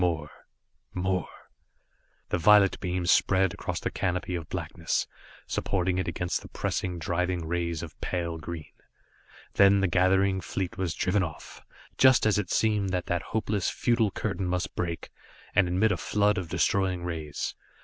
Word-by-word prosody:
More 80 -4 0 0.6
more 95 -1 -1 1.0
The 90 - 0
violet 100 +2 +5
beam 90 -1 -2
spread 95 +1 +3
across - - -4
the - - -3
canopy 90 0 -2
of 80 -3 -4
blackness, - - -2 0.4
supporting 90 -1 0
it 95 - -2
against 90 -1 -2
the - - -11
pressing, 90 -2 -2
driving 85 0 -1
rays 85 -1 -2
of - - -10
pale 85 -2 -2
green. 80 -1 -7 0.8
Then 100 0 +6
the 95 - +2
gathering 95 +2 +3
fleet 90 +3 -3
was 90 -3 -2
driven 95 +2 +1
off, 80 -6 -6 0.4
just 130 -4 +6
as 105 -1 +3
it 95 - -3
seemed 105 -3 +1
that 90 -1 -1
that 85 -1 -1
hopeless, 105 -3 -1
futile 115 -3 +1
curtain 95 -2 -3
must 90 0 -2
break, 85 -2 -3 0.4
and 100 - +4
admit 95 +5 +2
a - - 0
flood 105 0 +1
of 90 -3 -6
destroying 90 +1 +1
rays. 80 -4 -4
90 Hz, 155 wpm, -28 LUFS, 85-100 Hz, 1.0 s, Then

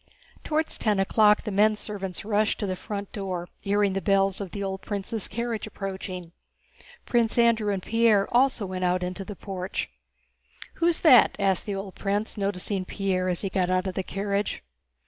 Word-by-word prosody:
Toward 315 +1 +1
ten 210 -8 0
o'clock 210 +2 +4
the 210 - -4
men 210 +2 +4
servants 195 -4 -5
rushed 210 0 +1
to - - -1
the 185 -1 -2
front 200 +1 -6
door, 185 -4 -4
hearing 200 -1 +1
the 195 - -1
bells 195 +1 +2
of 195 - -5
the 200 +3 -5
old 190 0 -3
prince's 205 +1 -2
carriage 230 0 -3
approaching. 190 -4 -6 0.7
Prince 235 -2 +1
Andrew 230 -3 +3
and 190 -2 -2
Pierre 225 -3 +3
also 250 -3 +3
went 185 -1 -4
out 180 0 +1
into 180 +2 -4
the 205 +1 -8
porch. 190 -1 -4 0.9
"Who's 335 0 +3
that?" 260 -8 +7
asked 195 -2 +1
the 200 - -2
old 195 -1 -6
prince, 205 +2 -2
noticing 195 -1 -2
Pierre 185 -1 -1
as 180 - -1
he 195 - -2
got 185 -1 +1
out 185 +1 +1
of 190 - -2
the 190 - -1
carriage. 200 +2 -2
200 Hz, 180 wpm, -26 LUFS, 190-215 Hz, 0.9 s, that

